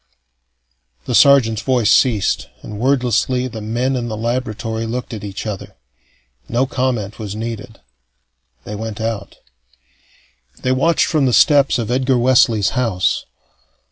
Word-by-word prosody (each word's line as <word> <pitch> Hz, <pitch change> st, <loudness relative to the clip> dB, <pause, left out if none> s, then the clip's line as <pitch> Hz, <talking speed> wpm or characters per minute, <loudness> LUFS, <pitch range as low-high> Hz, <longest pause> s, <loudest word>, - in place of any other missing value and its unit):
The -, -, -3 dB
sergeant's 120 Hz, -4 st, +5 dB
voice 120 Hz, -4 st, +2 dB
ceased, 100 Hz, -, +2 dB, 0.2 s
and 105 Hz, -1 st, -8 dB
wordlessly 125 Hz, 0 st, +1 dB
the 110 Hz, -3 st, -7 dB
men 120 Hz, +5 st, -1 dB
in 120 Hz, -2 st, -3 dB
the 110 Hz, -2 st, -4 dB
laboratory 115 Hz, -1 st, -3 dB
looked 120 Hz, +1 st, -5 dB
at 110 Hz, -, -7 dB
each 100 Hz, +1 st, -6 dB
other. 105 Hz, -3 st, -6 dB, 0.7 s
No 125 Hz, +3 st, +1 dB
comment 125 Hz, -6 st, -2 dB
was 105 Hz, -2 st, -5 dB
needed. 110 Hz, 0 st, -6 dB, 0.8 s
They 105 Hz, -, -7 dB
went 110 Hz, 0 st, -6 dB
out. 110 Hz, -3 st, -4 dB, 1.3 s
They 130 Hz, -, +1 dB
watched 155 Hz, +6 st, +2 dB
from 150 Hz, -5 st, +1 dB
the 125 Hz, -, +1 dB
steps 140 Hz, 0 st, +4 dB
of 115 Hz, -1 st, -3 dB
Edgar 130 Hz, 0 st, +1 dB
Wesley's 120 Hz, -5 st, +3 dB
house. 115 Hz, -8 st, -1 dB
115 Hz, 135 wpm, -18 LUFS, 110-130 Hz, 1.3 s, sergeant's